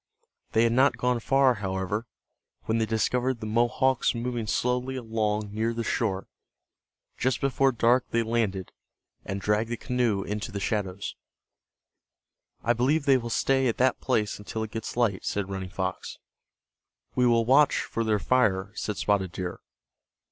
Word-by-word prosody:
They 110 Hz, -, +4 dB
had 115 Hz, -, +3 dB
not 130 Hz, +3 st, +4 dB
gone 125 Hz, -1 st, +1 dB
far, 135 Hz, +2 st, +3 dB
however, 100 Hz, +2 st, -3 dB, 0.6 s
when 110 Hz, +1 st, 0 dB
they 110 Hz, -, +1 dB
discovered 125 Hz, +3 st, 0 dB
the 110 Hz, -, -6 dB
Mohawks 120 Hz, +4 st, +2 dB
moving 120 Hz, -1 st, -3 dB
slowly 125 Hz, +4 st, 0 dB
along 110 Hz, -3 st, -2 dB
near 115 Hz, +2 st, -1 dB
the 115 Hz, -, -2 dB
shore. 100 Hz, -4 st, -1 dB, 0.9 s
Just 130 Hz, -1 st, +1 dB
before 135 Hz, 0 st, +2 dB
dark 120 Hz, +1 st, +2 dB
they 115 Hz, 0 st, +1 dB
landed, 110 Hz, -5 st, -1 dB, 0.5 s
and 95 Hz, +1 st, -3 dB
dragged 105 Hz, +3 st, 0 dB
the 120 Hz, -, -2 dB
canoe 120 Hz, -6 st, 0 dB
into 105 Hz, +2 st, -4 dB
the 100 Hz, -, -4 dB
shadows. 100 Hz, -2 st, -2 dB, 1.5 s
"I 120 Hz, -, +3 dB
believe 140 Hz, +6 st, +1 dB
they 135 Hz, -2 st, +5 dB
will 120 Hz, -1 st, -5 dB
stay 135 Hz, +2 st, +2 dB
at 115 Hz, -, -1 dB
that 130 Hz, 0 st, +2 dB
place 105 Hz, -1 st, 0 dB
until 110 Hz, +2 st, -4 dB
it 110 Hz, -, -6 dB
gets 115 Hz, +1 st, -5 dB
light," 115 Hz, -6 st, +1 dB
said 100 Hz, -1 st, -2 dB
Running 95 Hz, -1 st, -4 dB
Fox. 95 Hz, +1 st, -4 dB, 1.0 s
"We 125 Hz, -1 st, +3 dB
will 115 Hz, -1 st, +3 dB
watch 140 Hz, +4 st, +4 dB
for 115 Hz, -, -3 dB
their 110 Hz, -1 st, +2 dB
fire," 100 Hz, -4 st, +1 dB
said 105 Hz, -2 st, -4 dB
Spotted 100 Hz, -3 st, +1 dB
Deer. 90 Hz, 0 st, -5 dB
115 Hz, 155 wpm, -27 LUFS, 105-125 Hz, 1.5 s, they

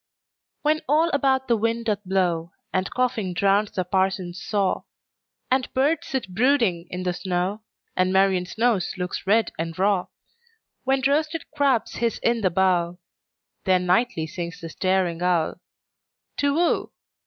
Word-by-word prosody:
When 305 Hz, +1 st, +2 dB
all 320 Hz, +3 st, +3 dB
about 265 Hz, -2 st, +2 dB
the 235 Hz, -, +3 dB
wind 230 Hz, +1 st, -1 dB
doth 210 Hz, -2 st, -1 dB
blow, 180 Hz, -3 st, 0 dB, 0.2 s
And 185 Hz, 0 st, 0 dB
coughing 225 Hz, -7 st, -1 dB
drowns 200 Hz, +2 st, +3 dB
the 185 Hz, -, 0 dB
parson's 185 Hz, -1 st, -1 dB
saw, 200 Hz, 0 st, 0 dB, 0.7 s
And 260 Hz, -1 st, +1 dB
birds 285 Hz, +5 st, +1 dB
sit 265 Hz, -8 st, -3 dB
brooding 220 Hz, -7 st, +2 dB
in 180 Hz, 0 st, -4 dB
the 180 Hz, -1 st, 0 dB
snow, 185 Hz, +3 st, -2 dB, 0.3 s
And 185 Hz, 0 st, +2 dB
Marian's 190 Hz, -1 st, +2 dB
nose 225 Hz, -5 st, +1 dB
looks 180 Hz, +1 st, -4 dB
red 220 Hz, +3 st, +3 dB
and 165 Hz, 0 st, -3 dB
raw; 195 Hz, -1 st, +2 dB, 0.8 s
When 265 Hz, 0 st, +1 dB
roasted 305 Hz, +3 st, +1 dB
crabs 280 Hz, -6 st, +1 dB
hiss 235 Hz, -1 st, 0 dB
in 235 Hz, -1 st, +2 dB
the 190 Hz, -, +3 dB
bowl—Then 180 Hz, +1 st, -1 dB
nightly 180 Hz, -2 st, +2 dB
sings 170 Hz, +1 st, -6 dB
the 165 Hz, -, -7 dB
staring 185 Hz, -1 st, 0 dB
owlTu 175 Hz, -2 st, +1 dB, 0.9 s
whoo! 320 Hz, +5 st, +1 dB
195 Hz, 140 wpm, -24 LUFS, 180-245 Hz, 0.9 s, all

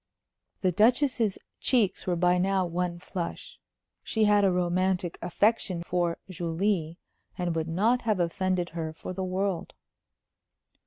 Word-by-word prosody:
The 185 Hz, -, +2 dB
Duchess's 230 Hz, -, +3 dB, 0.2 s
cheeks 225 Hz, -9 st, +1 dB
were 180 Hz, -, +2 dB
by 180 Hz, +1 st, +3 dB
now 190 Hz, 0 st, +2 dB
one 175 Hz, 0 st, -2 dB
flush. 175 Hz, -1 st, -6 dB, 0.4 s
She 220 Hz, -, 0 dB
had 210 Hz, -1 st, +5 dB
a 195 Hz, -, +4 dB
romantic 180 Hz, 0 st, 0 dB
affection 185 Hz, -1 st, +1 dB
for 175 Hz, -1 st, 0 dB
Julie, 170 Hz, -1 st, -1 dB, 0.4 s
and 175 Hz, -3 st, -1 dB
would 160 Hz, 0 st, -1 dB
not 215 Hz, +9 st, +2 dB
have 215 Hz, -4 st, 0 dB
offended 180 Hz, +1 st, 0 dB
her 160 Hz, -1 st, -4 dB
for 175 Hz, -, -7 dB
the 190 Hz, +1 st, -3 dB
world. 185 Hz, -1 st, -2 dB
180 Hz, 135 wpm, -28 LUFS, 175-200 Hz, 0.4 s, had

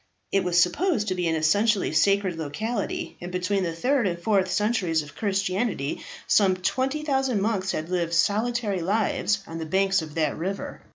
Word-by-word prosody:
It 195 Hz, -1 st, +2 dB
was 175 Hz, -1 st, +2 dB
supposed 210 Hz, -, +2 dB
to -, -, +1 dB
be 180 Hz, -2 st, -1 dB
an 160 Hz, -, +1 dB
essentially 200 Hz, +7 st, +2 dB
sacred 195 Hz, -3 st, +2 dB
locality, 200 Hz, +8 st, -3 dB
and 175 Hz, +1 st, -6 dB
between 185 Hz, +2 st, 0 dB
the 170 Hz, -3 st, -2 dB
third 250 Hz, +5 st, +1 dB
and 170 Hz, -2 st, -2 dB
fourth 190 Hz, +1 st, +1 dB
centuries 200 Hz, -8 st, +1 dB
of 145 Hz, -, -12 dB
Christianity 195 Hz, -, -1 dB, 0.2 s
some 195 Hz, -3 st, +4 dB
20,000 265 Hz, +4 st, 0 dB
monks 195 Hz, -2 st, 0 dB
had 155 Hz, -, -3 dB
lived 170 Hz, -2 st, 0 dB
solitary 210 Hz, +2 st, +1 dB
lives 200 Hz, +1 st, 0 dB
on 165 Hz, -2 st, -7 dB
the 160 Hz, -, -4 dB
banks 195 Hz, +2 st, +2 dB
of 155 Hz, -2 st, -9 dB
that 155 Hz, -3 st, 0 dB
river. 190 Hz, +5 st, -5 dB
195 Hz, 170 wpm, -25 LUFS, 170-215 Hz, 0.2 s, some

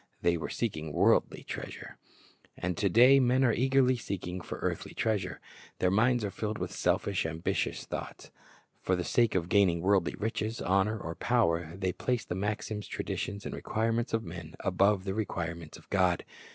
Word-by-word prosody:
They 85 Hz, 0 st, +3 dB
were 85 Hz, -, -4 dB
seeking 80 Hz, -10 st, -3 dB
worldly -, -, +3 dB
treasure. -, -, -7 dB, 0.6 s
And 90 Hz, 0 st, -2 dB
to 100 Hz, -, +1 dB
day 125 Hz, +7 st, +7 dB
men 130 Hz, +1 st, +3 dB
are 120 Hz, -3 st, +4 dB
eagerly 130 Hz, 0 st, +3 dB
seeking 90 Hz, -5 st, -5 dB
for -, -, -6 dB
earthly -, -, -3 dB
treasure. 100 Hz, -5 st, -1 dB, 0.4 s
Their 90 Hz, -, +2 dB
minds 115 Hz, +3 st, +3 dB
are 100 Hz, -, -3 dB
filled 105 Hz, +1 st, -3 dB
with -, -, -4 dB
selfish, 100 Hz, -2 st, 0 dB
ambitious 80 Hz, +1 st, -2 dB
thoughts. -, -, -7 dB, 0.5 s
For 95 Hz, -, +1 dB
the 90 Hz, -, -2 dB
sake 115 Hz, +1 st, +2 dB
of 85 Hz, -2 st, +1 dB
gaining 90 Hz, -3 st, +3 dB
worldly 95 Hz, -1 st, +2 dB
riches, 110 Hz, +1 st, -2 dB
honor, 95 Hz, +4 st, +1 dB
or 80 Hz, -5 st, -5 dB
power, 85 Hz, -7 st, +1 dB
they 95 Hz, -2 st, -1 dB
place 125 Hz, -5 st, -1 dB
the -, -, -3 dB
maxims, 105 Hz, +2 st, -3 dB
traditions, 100 Hz, +1 st, -4 dB
and -, -, -4 dB
requirements 115 Hz, +2 st, -1 dB
of 115 Hz, 0 st, 0 dB
men 85 Hz, -3 st, -8 dB
above 95 Hz, +1 st, +2 dB
the 95 Hz, -1 st, -2 dB
requirements 85 Hz, -6 st, -4 dB
of -, -, -18 dB
God. 90 Hz, -3 st, +2 dB
100 Hz, 170 wpm, -30 LUFS, 90-115 Hz, 0.6 s, day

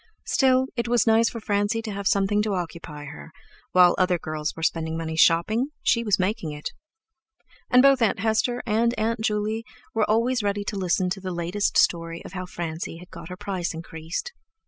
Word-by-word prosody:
Still, 260 Hz, -1 st, +3 dB
it 235 Hz, -1 st, -1 dB
was 240 Hz, 0 st, +3 dB
nice 225 Hz, 0 st, +4 dB
for 230 Hz, -, -6 dB
Francie 205 Hz, +1 st, 0 dB
to 220 Hz, -, -4 dB
have 200 Hz, -1 st, -3 dB
something 200 Hz, +1 st, +2 dB
to 210 Hz, -2 st, -1 dB
occupy 165 Hz, -4 st, -6 dB
her; 150 Hz, +2 st, -10 dB, 0.4 s
while 180 Hz, -1 st, +6 dB
other 180 Hz, -1 st, +3 dB
girls 155 Hz, -1 st, -4 dB
were 160 Hz, -, -7 dB
spending 160 Hz, 0 st, 0 dB
money 160 Hz, -1 st, -4 dB
shopping 170 Hz, +10 st, +3 dB, 0.2 s
she 235 Hz, -, +2 dB
was 205 Hz, -3 st, +2 dB
making 185 Hz, -4 st, -1 dB
it! 150 Hz, 0 st, -6 dB, 1.0 s
And 250 Hz, 0 st, +6 dB
both 275 Hz, -2 st, +5 dB
Aunt 225 Hz, -, +3 dB
Hester 220 Hz, +4 st, 0 dB
and 235 Hz, +2 st, +1 dB
Aunt 225 Hz, +1 st, 0 dB
Juley 215 Hz, +1 st, -1 dB, 0.3 s
were 220 Hz, -2 st, +1 dB
always 235 Hz, +3 st, +2 dB
ready 205 Hz, 0 st, -1 dB
to 205 Hz, -, -4 dB
listen 185 Hz, -1 st, 0 dB
to 195 Hz, +1 st, -3 dB
the 185 Hz, -, -4 dB
latest 175 Hz, +3 st, -1 dB
story 165 Hz, -1 st, +1 dB
of -, -, -9 dB
how 185 Hz, -1 st, -5 dB
Francie 165 Hz, -1 st, -5 dB
had 180 Hz, +2 st, -14 dB
got -, -, -10 dB
her 180 Hz, -, -7 dB
price 185 Hz, -4 st, -3 dB
increased. 165 Hz, -, -6 dB
200 Hz, 190 wpm, -25 LUFS, 170-225 Hz, 1.0 s, while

